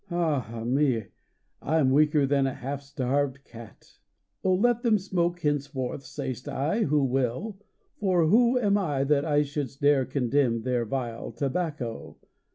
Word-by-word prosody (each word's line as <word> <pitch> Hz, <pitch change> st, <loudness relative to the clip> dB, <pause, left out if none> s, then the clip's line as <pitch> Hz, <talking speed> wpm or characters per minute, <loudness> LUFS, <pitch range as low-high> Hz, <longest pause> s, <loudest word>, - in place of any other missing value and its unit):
Ah, 140 Hz, -, -1 dB
me! 125 Hz, -4 st, +1 dB, 0.5 s
I 160 Hz, +3 st, 0 dB
m 135 Hz, -4 st, +3 dB
weaker 150 Hz, 0 st, +4 dB
than 135 Hz, 0 st, +2 dB
a 135 Hz, -, -3 dB
half 135 Hz, +2 st, -5 dB
starved 140 Hz, 0 st, -2 dB
cat. 115 Hz, -5 st, -14 dB, 0.4 s
Oh, 185 Hz, -1 st, +3 dB
let 240 Hz, +4 st, +2 dB
them 230 Hz, -4 st, +3 dB
smoke 175 Hz, -2 st, -1 dB
henceforth, 140 Hz, -3 st, -2 dB
say 135 Hz, -3 st, -4 dB
st 125 Hz, +4 st, -13 dB
I, 160 Hz, -, +1 dB
who 145 Hz, -1 st, +2 dB
will, 135 Hz, -, -1 dB, 0.4 s
For 185 Hz, -5 st, +2 dB
who 235 Hz, +8 st, +4 dB
am 205 Hz, -4 st, +2 dB
I 145 Hz, -8 st, 0 dB
that 140 Hz, 0 st, +2 dB
I 150 Hz, -2 st, +2 dB
shouldst 140 Hz, -2 st, -5 dB
dare 145 Hz, -2 st, +3 dB
condemn 125 Hz, -3 st, 0 dB
Their 125 Hz, -2 st, 0 dB
vile 120 Hz, -1 st, -4 dB
tobacco? 140 Hz, -5 st, -4 dB
140 Hz, 155 wpm, -27 LUFS, 130-165 Hz, 0.5 s, weaker